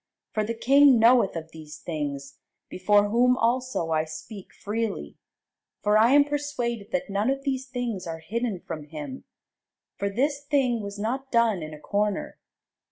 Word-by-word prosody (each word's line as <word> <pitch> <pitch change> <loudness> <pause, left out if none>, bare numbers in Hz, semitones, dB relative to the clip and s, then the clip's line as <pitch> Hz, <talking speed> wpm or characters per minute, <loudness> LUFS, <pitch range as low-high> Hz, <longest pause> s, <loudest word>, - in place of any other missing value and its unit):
For 215 - 0
the 230 +2 -3
king 275 +2 +6
knoweth 230 -4 +5
of 160 -1 -6
these 155 -1 -10
things, 140 -4 -5 0.3
before 205 +2 +3
whom 250 +3 +3
also 240 -8 0
I 155 0 +1
speak 160 +6 -9
freely: 215 0 -4 0.6
for 210 0 +3
I 225 +4 +5
am 290 0 +7
persuaded 285 -7 -3
that 275 0 -1
none 205 +5 +1
of 270 0 -1
these 265 -1 -2
things 245 -8 -4
are 165 -1 -4
hidden 215 +2 -3
from 155 -3 -7
him; 145 -3 -8 0.7
for 200 - -1
this 280 +7 -1
thing 270 -5 +1
was 200 0 -6
not 260 +6 -3
done 230 -6 +3
in 155 0 -6
a 150 - -10
corner. 205 +3 -2
220 Hz, 165 wpm, -26 LUFS, 175-255 Hz, 0.7 s, am